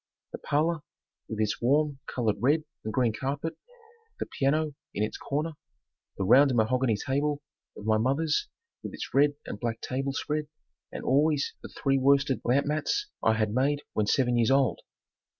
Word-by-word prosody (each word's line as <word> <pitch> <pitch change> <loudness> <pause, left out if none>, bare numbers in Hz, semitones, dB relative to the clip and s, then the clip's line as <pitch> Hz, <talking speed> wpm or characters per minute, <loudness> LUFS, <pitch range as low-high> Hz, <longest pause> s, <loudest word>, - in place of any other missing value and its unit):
The - - -6
parlor 155 +3 +1 0.5
with 110 - -4
its 110 +1 0
warm 145 +3 +2
colored 110 -5 0
red 145 +7 +3 0.2
and 110 - -3
green 120 -2 +1
carpet, 140 +7 -3 0.6
the - - -2
piano 150 +2 0 0.2
in 105 - 0
its 110 - -2
corner, 150 +4 -2 0.7
the - - -1
round 130 +6 +6
mahogany 115 0 +2
table 145 +4 -1 0.3
of 105 - -9
my 110 0 +3
mother's 150 - +1 0.3
with - - -7
its - - -7
red 145 +1 +4
and 100 - -6
black 115 -1 -2
table 135 +1 -2
spread 150 +2 -2 0.4
and - - -6
always 145 +2 +2
the - - -9
three 135 -1 0
worsted 140 0 +3
lamp 130 +4 +2
mats 155 - -1
I 110 - +4
had 110 -1 0
made 140 +4 +1
when 105 -1 0
seven 120 +1 +2
years 115 0 +3
old. 135 -3 +3
135 Hz, 170 wpm, -28 LUFS, 115-145 Hz, 0.7 s, round